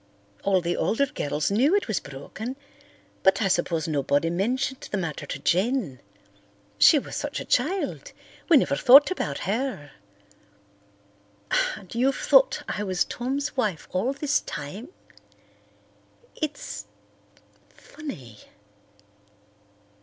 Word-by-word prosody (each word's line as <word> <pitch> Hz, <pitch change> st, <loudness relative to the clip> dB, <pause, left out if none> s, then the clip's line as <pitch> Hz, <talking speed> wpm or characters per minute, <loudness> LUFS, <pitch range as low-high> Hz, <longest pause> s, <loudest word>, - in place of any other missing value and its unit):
All 190 Hz, -2 st, +2 dB
the 175 Hz, 0 st, -1 dB
older 280 Hz, +5 st, +1 dB
girls 150 Hz, -, -2 dB
knew 265 Hz, -, +3 dB
it 410 Hz, -, 0 dB
was 215 Hz, -5 st, 0 dB
broken 195 Hz, -, -7 dB, 0.7 s
but 190 Hz, 0 st, +4 dB
I 210 Hz, -, +1 dB
suppose 170 Hz, -3 st, 0 dB
nobody 145 Hz, +1 st, +1 dB
mentioned 255 Hz, +9 st, -1 dB
the 205 Hz, -, -2 dB
matter 165 Hz, -6 st, -4 dB
to -, -, -4 dB
Jen. 185 Hz, -, 0 dB, 0.8 s
She 310 Hz, -, +8 dB
was 280 Hz, -, -4 dB
such -, -, -3 dB
a -, -, -6 dB
child, 390 Hz, +6 st, -1 dB, 0.4 s
we 330 Hz, -, +8 dB
never 280 Hz, -, +2 dB
thought 280 Hz, +5 st, +7 dB
about 150 Hz, -, -2 dB
her. 215 Hz, -, -2 dB, 1.9 s
And 190 Hz, -4 st, -12 dB
you've 260 Hz, +4 st, +1 dB
thought -, -, +4 dB
I -, -, -3 dB
was 185 Hz, -3 st, 0 dB
Tom's 270 Hz, +4 st, -3 dB
wife 210 Hz, -10 st, -1 dB
all 195 Hz, +8 st, 0 dB
this 290 Hz, +1 st, 0 dB
time? 185 Hz, -, -7 dB, 1.5 s
It's—funny." 285 Hz, -, -9 dB
215 Hz, 115 wpm, -25 LUFS, 170-275 Hz, 1.9 s, She